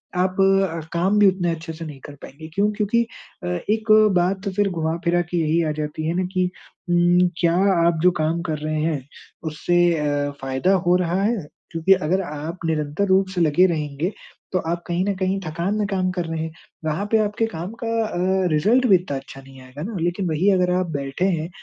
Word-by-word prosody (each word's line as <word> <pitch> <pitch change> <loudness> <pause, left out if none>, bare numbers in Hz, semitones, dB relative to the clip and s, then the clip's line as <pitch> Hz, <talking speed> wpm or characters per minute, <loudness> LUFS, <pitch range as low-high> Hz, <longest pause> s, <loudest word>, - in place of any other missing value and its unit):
आप 185 +1 0
अ, 195 -3 +3
काम 185 +5 +2
भी 205 - +7
उतने 185 -2 +1
अच्छे 165 0 -5
से 165 +1 -7
नहीं 145 -3 -9
कर 145 - -10
पाएँगे। 160 +4 -10
क्यों? 205 +4 +2
क्योंकि 215 +3 +1 0.4
अ, - - -3 0.2
एक 220 0 +1 0.3
बात 190 +3 0
फिर 205 -1 +2
घुमा-फिरा 170 +1 0
के 175 - 0
यही 165 +1 +2
आ - - 0
जाती 150 +1 -4
है 165 - 0
ना 185 +1 0
कि 185 0 +2 0.4
उम, 175 +1 +4
क्या 170 -1 +3 0.3
आप 165 -2 +1
जो 180 - +6
काम 165 +2 0
कर 155 - -1
रहे 155 0 -2
हैं, 145 -5 -2 0.4
उससे 175 +3 0 0.2
अ, 145 -1 -1
फ़ायदा 135 +8 +1
हो 180 - +5
रहा 180 +3 0
है? 230 +2 +1 0.3
क्योंकि 165 +3 +4
अगर 185 +1 0
आप 160 +2 -6
निरंतर 155 +3 0
रूप 190 +1 +3
से 175 - +1
लगे 165 +3 +4
रहेंगे, 155 +1 -2 0.4
तो 185 - +1
आप 170 0 -2
कहीं 175 +2 0
ना 200 - +1
कहीं 190 +1 0
थकान 170 +6 -2
में 210 -1 0
काम 185 -2 0
कर 180 -2 -3
रहे 165 0 -4
हैं। 160 - -5 0.3
वहाँ 155 +6 -1
पे 225 - +5
आपके 210 +1 0
काम 170 +5 -5
का - - -2 0.2
अ, 190 -2 0
रिज़ल्ट 225 +12 +3
भी 195 - +7
इतना 170 -6 -1
अच्छा 135 0 -10
नहीं 135 -1 -15
आएगा 130 +3 -11
ना, 215 +1 -5
लेकिन 175 +3 -1
वही 165 +6 +2
अगर 180 -2 +2
आप 185 -1 0
बैठे 140 +4 -2
हैं 170 -3 0
175 Hz, 210 wpm, -22 LUFS, 155-190 Hz, 0.4 s, भी